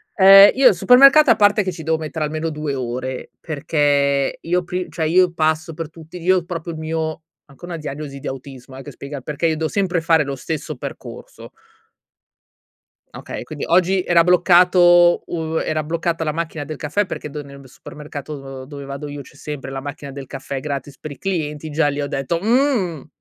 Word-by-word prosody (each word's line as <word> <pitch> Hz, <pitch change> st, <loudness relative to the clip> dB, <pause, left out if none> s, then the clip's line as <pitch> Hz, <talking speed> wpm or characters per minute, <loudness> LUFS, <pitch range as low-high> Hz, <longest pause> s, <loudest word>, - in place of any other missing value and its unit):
Ehm, 195 Hz, +1 st, +9 dB
io 260 Hz, 0 st, +6 dB
al 205 Hz, -, +1 dB
supermercato 275 Hz, -, +7 dB
a -, -, +5 dB
parte 205 Hz, 0 st, +3 dB
che 185 Hz, -, -2 dB
ci 165 Hz, -2 st, -9 dB
devo 160 Hz, +1 st, 0 dB
mettere 155 Hz, 0 st, -4 dB
almeno 155 Hz, +2 st, -3 dB
2 150 Hz, -2 st, -4 dB
ore 130 Hz, 0 st, -5 dB
perché 140 Hz, -2 st, 0 dB
io 180 Hz, +2 st, 0 dB
pri 180 Hz, +1 st, -4 dB
cioè 160 Hz, -, -3 dB
io 180 Hz, +2 st, +3 dB
passo 160 Hz, 0 st, 0 dB
per 165 Hz, -1 st, -6 dB
tutti 165 Hz, +2 st, -12 dB
io 185 Hz, +1 st, +2 dB
proprio 170 Hz, -1 st, -5 dB
il 155 Hz, -, -8 dB
mio 160 Hz, +1 st, -3 dB, 0.2 s
anche 140 Hz, +4 st, -14 dB
una 175 Hz, -1 st, -6 dB
diagnosi 145 Hz, -2 st, -7 dB
di -, -, -7 dB
autismo 130 Hz, 0 st, -9 dB
eh, 135 Hz, -, -9 dB
che 145 Hz, -, -9 dB
spiega 140 Hz, +1 st, -8 dB
perché 150 Hz, +5 st, -2 dB
io 160 Hz, -1 st, 0 dB
devo 160 Hz, 0 st, -2 dB
sempre 185 Hz, -3 st, 0 dB
fare 160 Hz, -2 st, +3 dB
lo 140 Hz, 0 st, -4 dB
stesso 155 Hz, +4 st, -5 dB
percorso. -, -, -9 dB, 1.7 s
Okay, -, -, -7 dB
quindi -, -, -7 dB
oggi 185 Hz, +2 st, +2 dB
era 170 Hz, -2 st, +4 dB
bloccato 175 Hz, 0 st, +5 dB
uhm, 160 Hz, -1 st, -2 dB
era 155 Hz, 0 st, -1 dB
bloccata 165 Hz, +1 st, -2 dB
la 155 Hz, -, -1 dB
macchina 160 Hz, -1 st, -4 dB
del 155 Hz, 0 st, -7 dB
caffè 155 Hz, +9 st, -1 dB
perché 165 Hz, -4 st, -6 dB
do 150 Hz, +1 st, -7 dB
nel 140 Hz, 0 st, -13 dB
b 135 Hz, -, -15 dB
supermercato, 140 Hz, -1 st, -9 dB
uhm, -, -, -9 dB
dove 140 Hz, +1 st, -9 dB
vado 140 Hz, +2 st, -6 dB
io 145 Hz, 0 st, -7 dB
c'è 135 Hz, -, -16 dB
sempre 145 Hz, -2 st, -7 dB
la 135 Hz, 0 st, -5 dB
macchina 140 Hz, 0 st, -7 dB
del 135 Hz, 0 st, -8 dB
caffè 135 Hz, +1 st, -6 dB
gratis 140 Hz, -1 st, -5 dB
per 155 Hz, -, -8 dB
i 140 Hz, -, -9 dB
clienti, 155 Hz, -5 st, -3 dB
e -, -, -6 dB
già 150 Hz, 0 st, +1 dB
li 145 Hz, 0 st, -3 dB
ho 145 Hz, -, -2 dB
detto: 135 Hz, +5 st, -2 dB
"Mhmm". 220 Hz, -, +1 dB
155 Hz, 200 wpm, -20 LUFS, 140-175 Hz, 1.7 s, Ehm